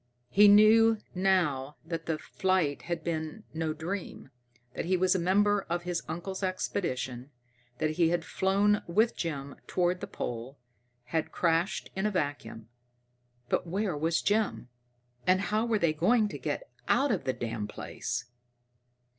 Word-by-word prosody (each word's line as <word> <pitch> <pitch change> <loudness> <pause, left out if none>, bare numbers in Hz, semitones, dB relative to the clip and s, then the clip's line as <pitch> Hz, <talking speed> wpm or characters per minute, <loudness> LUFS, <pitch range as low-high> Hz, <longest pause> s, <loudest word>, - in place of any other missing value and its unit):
He 205 +1 +7
knew 220 +2 +7 0.2
now 175 -8 +1
that 165 0 -5
the 160 -1 0
flight 185 -4 0
had 170 -2 -2
been 160 +5 -3
no 160 -1 -1
dream, 170 -3 -5 0.4
that - - -3
he 185 +2 +2
was 185 +1 +3
a 185 - +1
member 205 +3 +3
of 175 +1 -1
his 175 -1 -2
uncle's 175 +5 -5
expedition, 135 -9 -2 0.5
that 155 +2 0
he 165 +1 +2
had 175 0 0
flown 200 +3 +2
with 215 +7 +2
Jim 140 -4 -4
toward 180 0 +1
the - - -4
pole, 120 +3 -5 0.5
had 155 +6 -2
crashed 170 +2 0
in 190 +2 0
a - - -1
vacuum. 145 - -3 0.8
But - - 0
where 190 0 -1
was 160 +3 0
Jim? 205 - 0 0.6
And 185 +1 +5
how 215 +3 0
were 225 -2 +2
they 170 -5 +2
going 210 +7 +3
to - - -7
get - - -4 0.2
out 280 +1 +3
of 195 - -1
the 130 - +1
damn 110 -4 -4
place? 120 +3 -4
175 Hz, 155 wpm, -29 LUFS, 155-200 Hz, 0.8 s, He